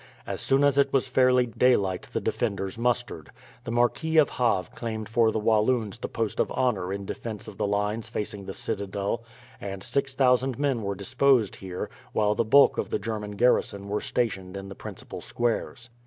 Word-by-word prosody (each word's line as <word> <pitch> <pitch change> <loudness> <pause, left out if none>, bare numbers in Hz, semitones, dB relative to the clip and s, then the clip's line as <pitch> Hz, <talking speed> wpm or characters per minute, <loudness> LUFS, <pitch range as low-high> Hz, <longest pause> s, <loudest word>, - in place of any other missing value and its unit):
As - - -4
soon 135 +1 +2
as 140 -1 +4
it 140 - +3
was 135 -1 +2
fairly 125 -1 +4
daylight 110 -6 +1
the - - -1
defenders 100 -4 -2
mustered. 120 -8 -1 0.3
The - - -5
Marquis 120 +7 +1
of 155 - +5
Havre 115 -8 0
claimed 110 -2 -4
for 115 -1 +3
the - - -2
Walloons 110 0 +1
the - - -4
post 115 -2 -2
of - - +1
honour 105 -8 0
in 100 0 -4
defence 110 +1 -6
of 105 -3 -10
the - - 0
lines 105 +2 -1
facing 105 -1 -4
the 95 - -6
citadel; 100 +1 -3 0.4
and 95 -1 -6
6000 130 -2 +1
men 140 -4 0
were 100 -1 -2
disposed 125 +2 +2
here, 90 -1 -5 0.3
while 105 -1 +2
the 115 - +1
bulk 140 +6 +5
of - - -2
the - - 0
German 105 -2 -4
garrison 100 -3 +1
were 105 +1 -1
stationed 100 -6 -2
in 95 0 -7
the - - -7
principal - - -8
squares. 120 0 -2
110 Hz, 185 wpm, -26 LUFS, 100-125 Hz, 0.4 s, of